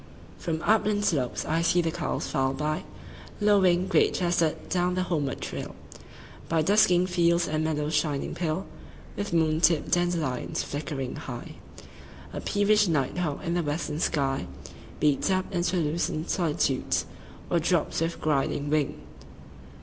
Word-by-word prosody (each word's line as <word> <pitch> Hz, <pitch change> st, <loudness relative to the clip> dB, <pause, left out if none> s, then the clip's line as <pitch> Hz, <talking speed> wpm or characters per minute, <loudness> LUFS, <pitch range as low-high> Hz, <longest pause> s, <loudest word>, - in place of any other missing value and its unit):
1From 165 Hz, -2 st, -2 dB
upland 210 Hz, -1 st, +3 dB
slopes 135 Hz, -10 st, 0 dB
I 165 Hz, +1 st, +1 dB
see 170 Hz, +1 st, +3 dB
the 165 Hz, -2 st, +1 dB
cows -, -, -2 dB
file 135 Hz, 0 st, 0 dB
by,2Lowing, 180 Hz, +5 st, 0 dB
great -, -, +3 dB
chested, 175 Hz, -3 st, 0 dB
down 180 Hz, 0 st, 0 dB
the 185 Hz, -, +1 dB
homeward 150 Hz, -7 st, -2 dB
trail,3By 160 Hz, -2 st, -6 dB
dusking 185 Hz, -3 st, +4 dB
fields 175 Hz, -1 st, +2 dB
and 155 Hz, 0 st, -1 dB
meadows 155 Hz, -1 st, -1 dB
shining 150 Hz, -2 st, 0 dB
pale4With 180 Hz, +4 st, -5 dB
moon 160 Hz, -1 st, +2 dB
tipped 165 Hz, -2 st, +3 dB
dandelions. 170 Hz, -7 st, 0 dB
Flickering 145 Hz, -3 st, -4 dB
high,5A 70 Hz, 0 st, -10 dB
peevish 210 Hz, 0 st, +3 dB
night 150 Hz, 0 st, 0 dB
hawk 155 Hz, -5 st, -2 dB
in 170 Hz, -, -1 dB
the 175 Hz, -, +1 dB
western 150 Hz, 0 st, -2 dB
sky6Beats 135 Hz, -, -1 dB
up 185 Hz, 0 st, +1 dB
into 175 Hz, +1 st, 0 dB
the 175 Hz, -, +1 dB
lucent 155 Hz, +1 st, -1 dB
solitudes,7Or 165 Hz, +1 st, -1 dB
drops 170 Hz, -1 st, +1 dB
with 165 Hz, +1 st, -1 dB
griding 145 Hz, -1 st, 0 dB
wing. 150 Hz, -2 st, 0 dB
165 Hz, 125 wpm, -27 LUFS, 150-180 Hz, -, dusking